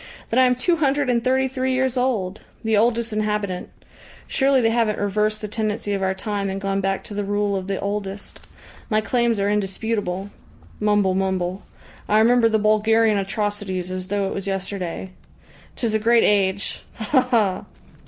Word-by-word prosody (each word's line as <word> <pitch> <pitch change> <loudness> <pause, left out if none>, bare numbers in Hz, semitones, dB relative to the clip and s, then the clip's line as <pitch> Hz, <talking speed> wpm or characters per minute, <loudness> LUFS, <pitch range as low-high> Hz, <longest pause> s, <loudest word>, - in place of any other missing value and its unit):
"Then 240 - +3
I 260 - +7
am 250 - +2
two 335 +7 +1
hundred 285 -3 +1
and 235 -1 +1
thirty 265 +1 +2
three 260 0 -1
years 260 -1 +1
old! 220 -7 -1 0.2
The 220 -1 +2
oldest 230 +1 +2
inhabitant. 210 -3 -2 0.6
Surely 270 -1 +2
they 225 -2 +2
haven't 225 -2 +1
reversed 210 +1 0
the 210 - -4
tendency 210 -1 -2
of 195 - -1
our 190 0 0
time 200 0 -3
and 190 +1 -3
gone 195 0 -1
back 195 0 -1
to - - -9
the 205 0 -2
rule 205 0 0
of 190 -1 -3
the 195 -1 -2
oldest. 200 0 -4 0.5
My 215 -2 +3
claims 235 -1 +1
are 200 - +1
indisputable. 205 -1 -2 0.5
Mumble, 210 -2 +2
mumble. 190 0 -1 0.5
I 210 - +4
remember 230 +1 +5
the 220 - +2
Bulgarian 215 0 +3
atrocities 195 -2 -3
as 185 0 -4
though 200 0 0
it - - -3
was 195 0 -5
yesterday. 190 -2 -4 0.6
'Tis 230 -3 -1
a 220 - +2
great 230 +2 +4
age! 200 -1 +1
Ha 245 +5 +2
ha!" 225 -7 +1
210 Hz, 175 wpm, -22 LUFS, 195-230 Hz, 0.6 s, I